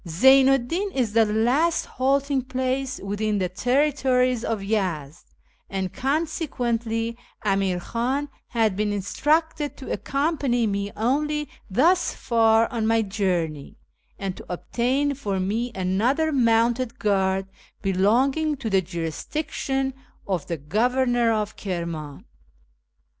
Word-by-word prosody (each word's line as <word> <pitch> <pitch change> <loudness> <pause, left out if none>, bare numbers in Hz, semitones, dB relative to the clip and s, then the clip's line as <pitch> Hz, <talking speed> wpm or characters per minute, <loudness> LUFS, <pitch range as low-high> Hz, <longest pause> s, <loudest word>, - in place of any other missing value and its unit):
Zeynu 265 +10 +6
'd 240 -2 -7
Di'n 385 +7 -1
is 240 -6 0
the 225 0 +5
last 245 +10 +2
halting 275 +1 +1
place 260 +1 -1
within 205 +1 -1
tlie 185 -2 -2
terri 275 +7 +2
tories 250 -3 +2
of 220 -3 -2
Yezd, 180 -8 -2 0.4
and 190 -2 -3
consequently 245 -6 -1 0.3
Amir 195 -3 +1
KIklu 255 +9 -2 0.2
had 225 -4 +1
been 210 +1 0
instructed 295 - 0
to 265 - -7
accompany 275 -4 0
me 200 -1 -2
only 295 +6 0 0.2
thus 325 - +3
far 225 -1 +3
on 225 -3 -1
my 225 0 +3
journey, 180 -8 -2 0.4
and 195 -2 -4
to - - -10
obtain 255 +10 0
for 205 -8 -3
me 220 +6 -1
another 225 +12 +1
mounted 240 -1 +2
guard 195 -3 +1 0.4
belonging 260 +11 +2
to 225 -4 -4
the 190 -1 +4
jurisdiction 265 - -3 0.3
of 185 -6 -2
the 170 - -2
Governor 240 - +1
of 215 -1 -1
Kirman. 170 -6 -5
230 Hz, 120 wpm, -24 LUFS, 195-270 Hz, 0.4 s, Zeynu